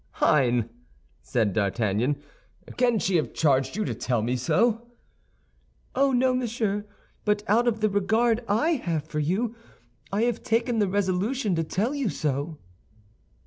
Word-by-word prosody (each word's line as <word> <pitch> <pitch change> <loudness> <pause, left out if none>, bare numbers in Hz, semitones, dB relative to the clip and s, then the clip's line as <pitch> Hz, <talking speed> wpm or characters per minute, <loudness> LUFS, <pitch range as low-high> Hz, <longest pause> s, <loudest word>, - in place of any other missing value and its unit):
"Hein!" 125 -5 +2 0.5
said 105 - 0
D'Artagnan, 110 +6 0 0.6
"can 245 -2 +2
she 190 -2 +1
have 155 - -2
charged 135 -4 +2
you 215 0 -1
to - - -2
tell 120 -4 -1
me 120 +3 0
so?" 230 - +1 1.0
"Oh, 275 +1 +3
no, 255 0 +3
monsieur; 220 -4 -1 0.4
but 210 0 +1
out 235 +4 +3
of 220 -2 0
the 215 - +4
regard 225 +4 +2
I 225 +11 +2
have 165 - -2
for 155 -1 -4
you, 200 +10 -1 0.6
I 205 +3 +1
have 235 -1 0
taken 230 +1 0
the 205 - +3
resolution 200 +4 0
to 165 -1 0
tell 205 - -1
you 280 -7 -1
so." 150 0 -2
205 Hz, 145 wpm, -26 LUFS, 150-235 Hz, 1.0 s, the